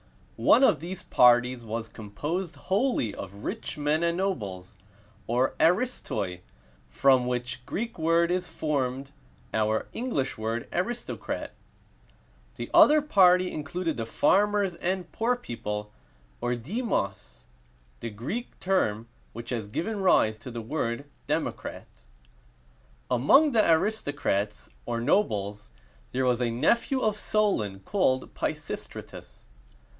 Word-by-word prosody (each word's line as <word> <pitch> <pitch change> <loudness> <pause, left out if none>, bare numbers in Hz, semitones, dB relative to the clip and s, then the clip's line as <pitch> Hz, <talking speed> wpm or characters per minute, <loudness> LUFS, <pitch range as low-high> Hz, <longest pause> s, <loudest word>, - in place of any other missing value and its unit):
One 270 - +5
of - - +5
these 175 +3 -7
parties 125 0 +4
was 115 0 -4
composed 150 - -4
wholly 195 - 0
of 100 +1 -9
rich - - -4
men 150 +2 +1
and 170 0 +1
nobles, 105 - -3 0.5
or 125 +3 +1
aristoi, 165 - +1 0.5
from 130 - +3
which 125 0 -3
Greek 230 -3 -4
word 165 +2 +3
is 180 0 -1
formed 135 -2 -2 0.4
our 110 0 +1
English 225 - -2
word 115 +2 -2
"aristocrat;" 230 +8 -3 1.0
the - - -6
other 300 0 +7
party 185 -9 +5
included 160 +2 -3
the 115 -1 -3
farmers 200 - +2
and 180 0 -2
poor 235 +2 +1
people, 105 - -5 0.5
or 120 0 0
demos, 120 - -3 0.5
the 115 - -4
Greek 130 - -5
term 115 - 0 0.3
which 115 +1 -8
has 115 -4 -2
given 200 - -3
rise 110 - +4
to 110 - -9
the 120 -1 -5
word 120 +1 -2 0.2
"democrat." - - -3 1.3
Among 270 - +5
the 220 -7 +3
aristocrats, 145 - 0 0.2
or 120 -1 -1
nobles, 105 - 0 0.4
there 130 +1 0
was 125 -1 +2
a 120 - +1
nephew 235 - +2
of 215 -1 +2
Solon 150 - 0
called 130 - 0
Pi - - -1
sis´tra - - -7
tus. - - -13
140 Hz, 120 wpm, -27 LUFS, 115-190 Hz, 1.3 s, other